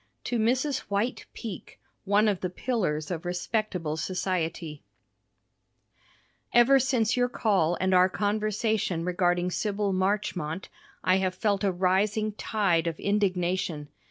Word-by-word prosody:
To 240 - -1
Mrs. 255 +6 +1
White 210 +5 -1
Peak 220 -6 -8 0.3
One 205 +2 +3
of 200 -4 +1
the 185 - -1
Pillars 180 - -2
of 165 -1 -3
Respectable 180 -3 -2
Society 170 -3 -2 1.7
Ever 240 +3 +6
since 245 -4 +1
your 245 0 +2
call 195 -8 +1
and 190 0 +1
our 185 0 +5
conversation 210 -3 -1
regarding 180 0 +1
Sybyl 205 0 -1
Marchmont, 185 -3 -1 0.3
I 185 +1 +4
have 185 -1 -1
felt 205 0 0
a 195 - +3
rising 195 +4 +1
tide 195 -6 0
of 165 - -3
indignation. 185 -6 0
190 Hz, 125 wpm, -27 LUFS, 175-215 Hz, 1.7 s, Ever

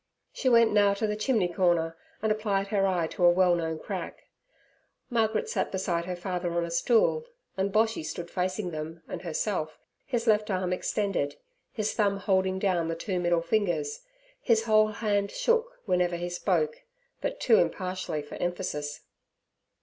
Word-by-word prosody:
She 260 - +1
went 230 -2 +5
now 205 -1 +4
to 210 - -1
the 210 0 -1
chimney 215 -3 +1
corner, 175 -2 +1 0.3
and 220 - +2
applied 200 -2 0
her 195 -2 +2
eye 180 -3 +1
to 175 - -4
a 175 - +8
well 180 0 +4
known 160 -2 -1
crack: - - -6 0.9
Margaret 220 -2 +1
sat - - -1
beside 175 -3 -1
her 180 0 -3
father 175 -1 -3
on 170 0 0
a 170 - -6
stool, 240 - +2 0.3
and 195 +1 0
Boshy 220 -4 +2
stood 170 +2 -6
facing 185 +1 -2
them 160 +1 -6
and - - -6
herself, 165 -2 -2 0.3
his 240 -4 -1
left 215 -2 +3
arm 185 -2 0
extended, 180 -6 -1 0.4
his 215 -2 -2
thumb 200 -3 +1
holding 190 -1 +1
down 185 -4 +1
the 165 - -2
two 180 +2 -2
middle 175 -1 +1
fingers. 215 - 0 0.4
His 225 - +3
whole 215 -1 +5
hand 205 -1 0
shook 470 - 0
whenever 180 -3 +1
he 175 +1 -3
spoke, 460 - 0 0.4
but - - -3
too 455 - +5
impartially 185 - -2
for 145 - -9
emphasis. 175 -5 -3
190 Hz, 165 wpm, -28 LUFS, 175-215 Hz, 0.9 s, a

